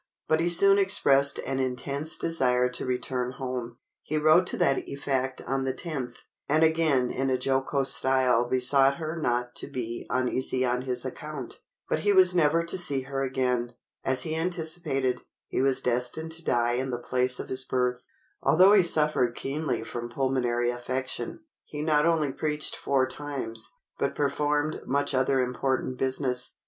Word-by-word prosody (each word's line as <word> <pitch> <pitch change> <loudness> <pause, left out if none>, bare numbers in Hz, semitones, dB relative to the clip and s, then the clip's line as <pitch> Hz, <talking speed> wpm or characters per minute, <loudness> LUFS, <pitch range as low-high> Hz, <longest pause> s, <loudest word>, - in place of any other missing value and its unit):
But 155 - +2
he 170 +1 +1
soon 195 +3 +5
expressed 140 -8 +3
an 135 +1 -2
intense 140 +4 -3
desire 125 -6 +1
to 125 - -5
return 125 0 -2
home. 125 -2 -5 0.2
He 155 - -3
wrote 155 +4 +4
to - - 0
that 135 - +2
effect 135 -2 -2
on 135 0 -1
the 130 0 -2
10th, 135 -8 -5 0.3
and 155 +2 +3
again 160 -6 +2
in 135 +1 -1
a 130 - +1
jocose 135 +1 0
style 130 -3 +2
besought 135 +2 +5
her 160 -1 -4
not 125 -5 -1
to - - -6
be 120 -2 -5
uneasy 130 0 0
on 125 0 0
his 125 -1 0
account. - - -7 0.3
But - - 0
he 205 0 +2
was 185 -1 +6
never 165 -1 +3
to 170 +3 -1
see 145 -7 -1
her 135 +1 -4
again. 125 -2 -1 0.3
As 130 -1 +1
he 160 -1 -3
anticipated, 160 -6 -1 0.2
he - - -2
was 135 -1 +2
destined 125 +6 -1
to 165 +1 -6
die 120 -3 +1
in 130 +2 -1
the 120 - -2
place 125 +1 0
of - - -6
his 130 0 +1
birth. 125 -1 -1 0.3
Although 180 +8 +5
he 205 - +7
suffered 150 -8 +2
keenly 140 -3 -3
from 120 +1 -6
pulmonary 120 -2 0
affection, 130 - -4 0.2
he 150 0 -6
not 150 0 +3
only 155 -4 +1
preached 150 +1 -1
four 135 -2 +1
times, 130 -5 -4 0.3
but - - -1
performed 150 +1 0
much 140 +2 0
other 130 0 +2
important 130 +1 -2
business. 130 -1 0
135 Hz, 165 wpm, -27 LUFS, 125-155 Hz, 0.3 s, he